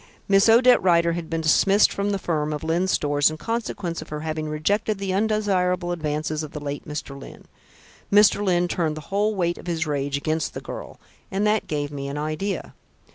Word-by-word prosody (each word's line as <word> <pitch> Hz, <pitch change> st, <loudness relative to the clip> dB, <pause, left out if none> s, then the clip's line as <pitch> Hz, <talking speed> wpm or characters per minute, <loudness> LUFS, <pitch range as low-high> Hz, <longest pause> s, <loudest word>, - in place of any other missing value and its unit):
"Miss 195 Hz, +2 st, +5 dB
Odette 245 Hz, +2 st, +6 dB
Rider 170 Hz, -2 st, +3 dB
had 170 Hz, -1 st, -5 dB
been 165 Hz, 0 st, -1 dB
dismissed 195 Hz, +6 st, +4 dB
from 200 Hz, +1 st, -1 dB
the 200 Hz, -, 0 dB
firm 155 Hz, -5 st, -2 dB
of 150 Hz, -, -5 dB
Lyne's 170 Hz, +4 st, 0 dB
Stores 145 Hz, -4 st, +2 dB
in 155 Hz, -, -6 dB
consequence 200 Hz, -6 st, -3 dB
of 155 Hz, -, -10 dB
her 150 Hz, 0 st, -5 dB
having 155 Hz, -1 st, -3 dB
rejected 200 Hz, +8 st, 0 dB
the 195 Hz, -1 st, -3 dB
undesirable 190 Hz, -4 st, +1 dB
advances 155 Hz, -2 st, -2 dB
of 155 Hz, -1 st, -7 dB
the 150 Hz, -, -5 dB
late 145 Hz, +1 st, -6 dB
Mr. 150 Hz, -1 st, -5 dB
Lyne. -, -, -12 dB, 0.7 s
Mr. 205 Hz, 0 st, +5 dB
Lyne 175 Hz, -2 st, +2 dB
turned 160 Hz, -3 st, -1 dB
the 155 Hz, -, -10 dB
whole 210 Hz, +2 st, +1 dB
weight 175 Hz, -2 st, -1 dB
of -, -, -12 dB
his 165 Hz, -1 st, -1 dB
rage 140 Hz, -1 st, -1 dB
against 155 Hz, +1 st, -2 dB
this -, -, -6 dB
girl, -, -, -8 dB, 0.3 s
and 195 Hz, +2 st, -1 dB
that 210 Hz, 0 st, +1 dB
gave 145 Hz, -1 st, -2 dB
me 140 Hz, -1 st, -5 dB
an 140 Hz, +1 st, -5 dB
idea. 155 Hz, +7 st, -3 dB
170 Hz, 200 wpm, -24 LUFS, 155-200 Hz, 0.7 s, Odette